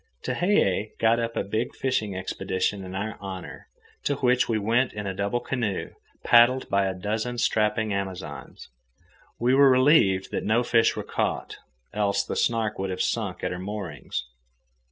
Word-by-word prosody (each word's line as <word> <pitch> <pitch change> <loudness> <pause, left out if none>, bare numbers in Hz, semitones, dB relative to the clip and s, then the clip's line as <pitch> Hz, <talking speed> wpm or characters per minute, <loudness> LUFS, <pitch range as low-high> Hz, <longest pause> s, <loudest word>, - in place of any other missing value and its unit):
Tehei 110 - +1
got 115 +1 +3
up 115 0 -3
a - - +1
big 110 +4 -2
fishing 110 -7 -1
expedition 95 +1 -2
in 95 0 -7
our 105 +3 -4
honour, 95 -2 -8 0.4
to 145 - 0
which 125 -3 +2
we 115 - +2
went 115 +5 +1
in 105 -1 -5
a 95 - -2
double 100 +5 -1
canoe, 115 -7 -3 0.3
paddled 120 +2 +5
by 100 0 +2
a 95 - -3
dozen 110 +6 -3
strapping 110 -1 +1
Amazons. 95 -2 -6 0.7
We 120 +2 +2
were 140 0 +7
relieved 130 -8 +4
that - - -2
no 115 +3 +2
fish 115 -1 +3
were - - -4
caught, - - -2 0.4
else 100 -1 +1
the - - -4
Snark 115 -3 0
would 95 0 -2
have 90 0 -4
sunk - - -2
at - - -1
her 90 - -4
moorings. 95 -9 -5
105 Hz, 165 wpm, -26 LUFS, 95-120 Hz, 0.7 s, were